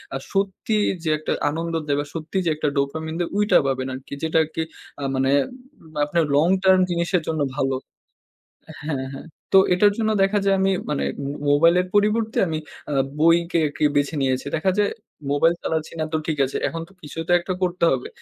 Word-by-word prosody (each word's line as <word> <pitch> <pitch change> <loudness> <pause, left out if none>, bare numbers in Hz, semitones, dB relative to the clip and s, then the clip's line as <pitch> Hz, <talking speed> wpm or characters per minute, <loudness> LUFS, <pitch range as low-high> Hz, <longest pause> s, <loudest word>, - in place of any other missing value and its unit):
আ - - 0 0.2
সত্যি 195 +2 -1 0.3
যে 160 - -1
একটা 155 - -4 0.2
আনন্দ 165 +2 -3
দেয় 140 - +1
বা, 145 - -2
সত্যি 165 +3 -4
যে - - +2
একটা 150 - -1
dopamine 160 +3 -2
দেয় 175 - -1
ওইটা 210 0 +4
পাবেন 130 -1 -1
আরকি। 130 +2 -9
যেটা 160 0 +1
আরকি 160 +1 -3 0.4
আ - - -3
মানে 135 0 +1 0.8
আপনার 165 +2 +1
long 165 +6 +4
term 190 0 +6
জিনিসের 170 +1 +1
জন্য 160 -2 -1 0.2
ভালো। 135 -1 +1 1.1
হ্যাঁ, 135 -4 -2
হ্যাঁ, 135 - -9 0.3
তো 195 - +8 0.2
এটার 205 +3 +4
জন্য 220 -1 +1
দেখা 195 +2 +3
যায় 195 -1 +3
আমি 195 0 +3 0.2
মানে 145 - 0 0.2
ম - - -3 0.2
মোবাইলের 170 +5 +4
পরিবর্তে 215 +2 +2
আমি 160 -1 -2 0.3
আ - - -2 0.3
বইকে 170 +1 +4
আরকি 150 +1 -2
বেছে 145 +2 +1
নিয়েছি। 130 0 0
দেখা 190 +4 +1
যায় 205 -1 +3 0.4
মোবাইল 165 +4 +3
চালাচ্ছি 160 -1 -2
না। 155 - +1
তো - - +2
ঠিক 155 -3 -2
আছে। 135 - -5
এখন 165 0 -5
তো - - -20
কিছু 150 +2 -9
তো 175 - +3
একটা 185 +2 -3
করতে 180 -1 +1
হবে। 130 -1 -2
165 Hz, 190 wpm, -23 LUFS, 145-185 Hz, 1.1 s, তো